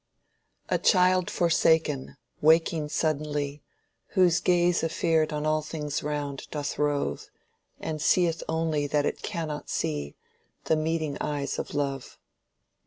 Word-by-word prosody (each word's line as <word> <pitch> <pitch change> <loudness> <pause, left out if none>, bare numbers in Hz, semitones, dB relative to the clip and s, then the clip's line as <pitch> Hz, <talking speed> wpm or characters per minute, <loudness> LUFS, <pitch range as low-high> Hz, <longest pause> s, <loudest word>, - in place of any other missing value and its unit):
"A - - +1
child 185 -1 +4
forsaken, 160 -5 +2 0.2
waking 160 0 +3
suddenly, 150 -1 -1 0.6
Whose 175 -2 +5
gaze 175 -1 +2
afeard 165 -1 +1
on 150 0 -2
all 155 0 +2
things 150 -2 -4
round 145 -2 -4
doth 145 -2 -4
rove, 145 -1 -1 0.5
And 155 -1 -4
seeth 170 0 +2
only 160 -2 0
that 145 0 +1
it - - -2
cannot 155 -3 -4
see 75 -1 -2 0.5
The 160 - +2
meeting 155 -2 -1
eyes 145 -2 -2
of - - -5
love." 140 -2 -3
155 Hz, 120 wpm, -27 LUFS, 145-165 Hz, 0.6 s, Whose